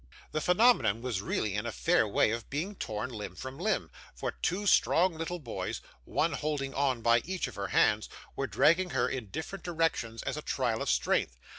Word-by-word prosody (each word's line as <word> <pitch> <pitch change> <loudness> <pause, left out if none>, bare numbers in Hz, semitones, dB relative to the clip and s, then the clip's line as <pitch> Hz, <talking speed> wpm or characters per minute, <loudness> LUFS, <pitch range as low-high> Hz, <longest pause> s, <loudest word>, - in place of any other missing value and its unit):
The 155 - -1
phenomenon 180 - +4
was 120 -7 -2
really 105 0 -1
in 105 +3 -2
a - - -2
fair 170 -5 +2
way 105 +1 +3
of 115 0 -4
being 165 +9 -2
torn 110 - -4
limb 105 -5 -6
from 130 - -7
limb; 215 +4 0 0.2
for - - -3
two 200 +3 -2
strong 185 -2 +4
little 165 +2 -3
boys, 135 -9 -4 0.3
one - - +1
holding 145 -3 -2
on 130 -4 0
by 115 0 +5
each 185 +7 -3
of - - -9
her 100 -1 -4
hands, 105 +3 +3 0.3
were 135 - -1
dragging 180 +7 +3
her 120 - +3
in 125 -5 -4
different 160 - -6
directions 165 -10 -1
as - - -3
a - - -3
trial 120 -6 -1
of - - -1
strength. - - +1
135 Hz, 195 wpm, -30 LUFS, 110-170 Hz, 0.3 s, by